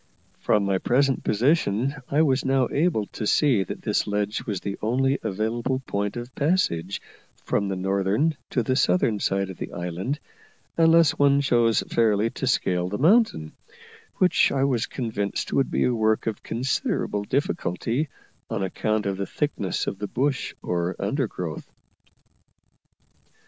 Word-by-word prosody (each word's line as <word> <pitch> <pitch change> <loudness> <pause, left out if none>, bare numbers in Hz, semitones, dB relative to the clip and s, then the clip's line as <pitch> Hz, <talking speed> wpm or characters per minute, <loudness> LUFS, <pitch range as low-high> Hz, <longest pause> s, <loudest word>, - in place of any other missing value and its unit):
From 105 -2 +2
my 95 -1 +1
present 135 +4 +1
position 125 0 +1 0.2
I 150 +3 +3
was 135 -3 +2
now 135 -2 +2
able 150 -9 +1
to 105 - -3
see 130 -8 +3
that - - -7
this - - 0
ledge 105 0 -1
was 100 -4 -2
the 100 -1 -4
only 135 +5 +1
available 115 +6 -1
point 100 +1 -2
of 120 +2 -7
passage 140 - 0 0.5
from 100 - 0
the 95 - -2
northern 100 - +1
to 120 - 0
the 130 +3 0
southern 100 0 +2
side 95 0 0
of 95 - -11
the - - -5
island 90 - -3 0.6
unless 165 -1 +5
one 140 0 +5
chose 120 -5 +3
fairly 110 -1 +2
to 130 - -4
scale 90 -7 +1
the 105 - -3
mountain, 165 - +3 0.6
which 180 -2 +3
I 135 -1 +1
was 125 -4 +1
convinced 110 -5 -3
would 135 - +2
be - - +1
a 125 - +2
work 110 -1 +1
of 110 -2 -3
considerable 125 - -1
difficulty, 130 - -1 0.4
on - - -2
account 110 +3 -1
of 100 -1 -1
the 100 - -3
thickness 145 - -2
of 100 - -4
the 105 - -3
bush 135 +5 -1
or 90 +1 -1
undergrowth. 100 - -3
115 Hz, 150 wpm, -25 LUFS, 100-135 Hz, 0.6 s, unless